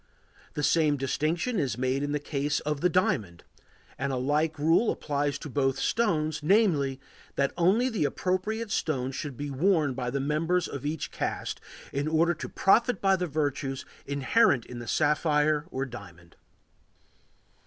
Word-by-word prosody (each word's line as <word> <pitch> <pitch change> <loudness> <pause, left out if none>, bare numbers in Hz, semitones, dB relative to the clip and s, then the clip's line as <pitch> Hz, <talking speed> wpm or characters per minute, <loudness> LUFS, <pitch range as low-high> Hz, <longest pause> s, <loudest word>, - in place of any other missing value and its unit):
The 150 - -2
same 155 -3 +3
distinction 160 - -1
is 130 -7 -1
made 130 +2 0
in 145 0 -2
the 150 - +1
case 145 0 -1
of 150 -1 -2
the 180 - +3
diamond, 105 - 0 0.6
and 140 +1 -1
a - - -1
like 150 +5 0
rule 165 +9 +3
applies 145 -1 -1
to 155 - -8
both 135 -1 0
stones, 155 -9 0
namely, 150 -7 +2 0.4
that 140 - +1
only 190 +9 +3
the 220 - 0
appropriate 205 +7 -2
stone 135 -9 -1
should 140 -1 -6
be 145 0 -4
worn 155 -1 +2
by 125 -1 -3
the 140 +2 -2
members 160 +6 0
of 140 +1 -5
each 155 0 -3
caste, - - -3 0.3
in 140 +2 -1
order 165 +2 +3
to 165 - -7
profit 235 +3 +3
by 195 -1 +3
the 180 -1 -2
virtues 145 -3 -2 0.2
inherent 140 - +2
in 125 -1 -8
the 120 - -8
sapphire 150 +1 +2
or 135 -4 -3
diamond. 90 -9 -12
150 Hz, 160 wpm, -28 LUFS, 135-170 Hz, 0.6 s, same